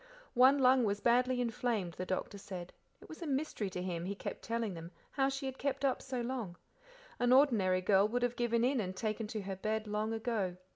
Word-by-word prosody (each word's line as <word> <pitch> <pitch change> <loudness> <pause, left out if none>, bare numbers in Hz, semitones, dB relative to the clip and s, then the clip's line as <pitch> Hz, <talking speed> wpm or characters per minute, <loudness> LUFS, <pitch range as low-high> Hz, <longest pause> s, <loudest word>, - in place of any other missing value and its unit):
One 260 +3 +6
lung 260 -1 +5
was 205 -2 0
badly 250 +3 +3
inflamed, 225 -6 -1
the 185 +2 -5
doctor 190 +2 -3
said; 180 -3 -7 0.3
it - - -13
was 315 - -10
a 335 - -4
mystery 270 -7 -1
to 180 -1 -4
him, 175 -2 -3
he 200 +2 -3
kept - - -6
telling 230 -3 -2
them, 165 0 -8 0.2
how 270 -1 +2
she 270 0 -4
had 265 0 -5
kept 280 0 -1
up 265 - +1
so 260 -2 -3
long; 235 -7 -4 0.6
an 245 0 +3
ordinary 220 -9 +4
girl 195 +2 +4
would 245 +3 -1
have 245 0 0
given 235 -1 +1
in 260 +1 +2
and 185 -2 -4
taken 215 +1 -2
to 215 0 -4
her 195 0 -4
bed 215 +2 -1
long 210 +1 -2
ago. 220 -5 -2
225 Hz, 220 wpm, -34 LUFS, 195-255 Hz, 0.6 s, One